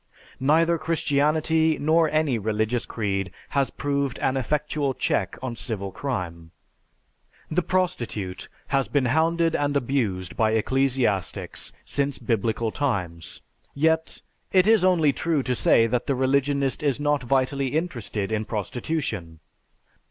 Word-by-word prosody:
Neither 165 +5 +3
Christianity 155 0 +2
nor 160 +2 +3
any 155 -6 +1
religious 110 +3 -1
creed 100 -4 -2 0.2
has 140 -1 +1
proved 140 -2 -2
an 130 - 0
effectual 145 +1 -1
check - - -1
on 125 -2 -3
civil 100 -4 -4
crime. 90 -10 -4 1.0
The 170 +3 +2
prostitute 125 - -2 0.2
has 135 -1 +1
been 140 -3 +1
hounded 165 +5 +2
and 145 0 +1
abused 115 -10 -1
by 110 -1 +2
ecclesiastics 125 -3 0
since 140 -1 -1
Biblical 115 -1 -1
times, 90 - -3 0.3
yet, 160 +2 +1 0.3
it 185 -1 +5
is 220 -3 +5
only 165 -6 +4
true 155 +1 0
to 125 - 0
say 115 -1 +4
that 120 +1 -1
the 140 - +1
religionist 140 +2 +1
is 145 -3 +1
not 145 -1 +1
vitally 135 +2 +1
interested 115 - -3
in 110 -1 0
prostitution. 105 - -3
135 Hz, 125 wpm, -25 LUFS, 110-155 Hz, 1.0 s, it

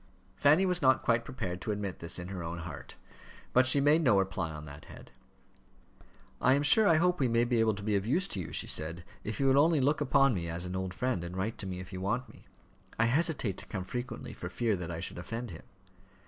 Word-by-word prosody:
Fanny 155 +7 +4
was 180 -1 +1
not 130 -2 +4
quite 115 0 +2
prepared 90 -8 -5
to 110 - -3
admit 100 -3 -4
this 85 0 -2
in 90 0 -7
her 95 -2 -5
own 85 +1 -5
heart, 85 -4 -8 0.6
but 130 +1 +5
she 135 +2 +4
made 145 +4 +4
no 120 -10 +4
reply 95 -4 -1
on 75 -1 -8
that 75 0 -11
head. - - -13 1.3
"I 130 - +5
am 140 +1 +2
sure 205 +9 +6
I 165 - +5
hope 180 +2 +2
we 130 - +2
may 115 0 +2
be 120 -1 +1
able 110 -2 +2
to 100 - -8
be 105 0 0
of 100 +1 -1
use 180 +10 +2
to 100 - -4
you," 90 - -5
she - - 0
said, 80 +3 -2 0.2
"if 110 - -5
you 135 - +1
will 135 +1 +5
only 160 -1 +3
look 145 +3 +1
upon 135 -2 +3
me 85 -4 -3
as 85 +2 -2
an 90 +1 -5
old 95 -1 -4
friend, 125 -7 -1
and 85 +2 -6
write 105 +5 -3
to 100 - -3
me 90 -1 -5
if 95 +1 -9
you 95 - -5
want 120 +7 -2
me. - - -17 0.5
I 115 - +3
hesitate 130 - +1
to - - -5
come 95 -2 -4
frequently 120 +6 -6
for 90 - -7
fear 110 +3 0
that 90 -2 -6
I 85 -1 -5
should 90 - -4
offend 115 +4 -5
him." 80 - -9
110 Hz, 250 wpm, -30 LUFS, 90-130 Hz, 1.3 s, sure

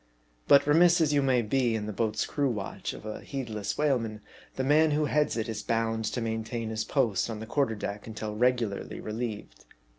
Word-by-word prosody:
But 140 - +7
remiss 170 +4 +5
as 155 -3 +2
you 145 - +4
may 130 -3 +2
be 120 +1 +1
in 105 -1 -2
the 105 - -4
boats 110 +1 0
crew 145 -2 0
watch 105 -5 -4
of - - -11
a 110 - -5
heedless 115 -7 -4
whaleman, 115 -8 0 0.3
the 130 - -1
man 155 +4 +4
who 150 +1 +1
heads 150 -3 +1
it 115 0 -1
is 110 -2 -4
bound 115 0 -1
to 120 - -2
main 110 -1 -2
tain 115 0 -4
his 110 0 -1
post 120 -5 +1
on 110 -2 -4
the 110 - -6
quarter 125 -1 0
deck 105 0 -5
until 110 -1 -5
regularly 120 -3 0
relieved. 105 - -5
115 Hz, 205 wpm, -28 LUFS, 110-135 Hz, 0.3 s, But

